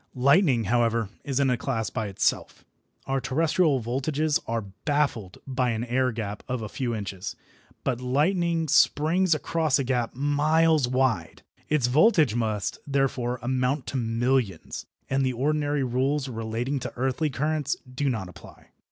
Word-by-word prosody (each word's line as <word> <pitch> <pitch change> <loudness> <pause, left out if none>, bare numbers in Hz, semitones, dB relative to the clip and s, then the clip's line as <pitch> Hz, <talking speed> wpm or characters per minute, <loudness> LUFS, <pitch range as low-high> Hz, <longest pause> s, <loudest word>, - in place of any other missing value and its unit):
Lightning, 140 - +4
however, 115 -2 +1
is 140 -1 -1
in 135 -2 +3
a 125 - +1
class 115 -4 -2
by 110 - -2
itself. 95 - -1 0.4
Our 135 0 -1
terrestrial 155 +1 +2
voltages 140 +6 0
are 115 0 -1 0.2
baffled 140 - 0
by 130 -2 0
an 115 0 -1
air 125 +1 +1
gap 105 -3 -5
of 125 -3 -3
a 105 - -5
few 120 -1 -2
inches, 100 -3 -5 0.5
but 125 -2 -1
lightning 165 +5 +1
springs 165 +5 +3
across 155 -1 +1
a 140 - 0
gap 125 -2 -1
miles 150 +1 +3
wide. 125 -10 0 0.3
Its 150 -5 +2
voltage 155 - +4
must, 110 -3 -2
therefore, 135 -3 0
amount 130 +2 0
to - - 0
millions, 115 -4 -1 0.2
and 135 0 +1
the 130 -1 0
ordinary 145 +2 0
rules 130 +3 0
relating 115 +3 -3
to - - -5
earthly 130 +5 0
currents 145 +1 -1 0.2
do 140 +2 0
not 110 -7 -2
apply. 90 - -14
130 Hz, 150 wpm, -26 LUFS, 120-145 Hz, 0.5 s, Lightning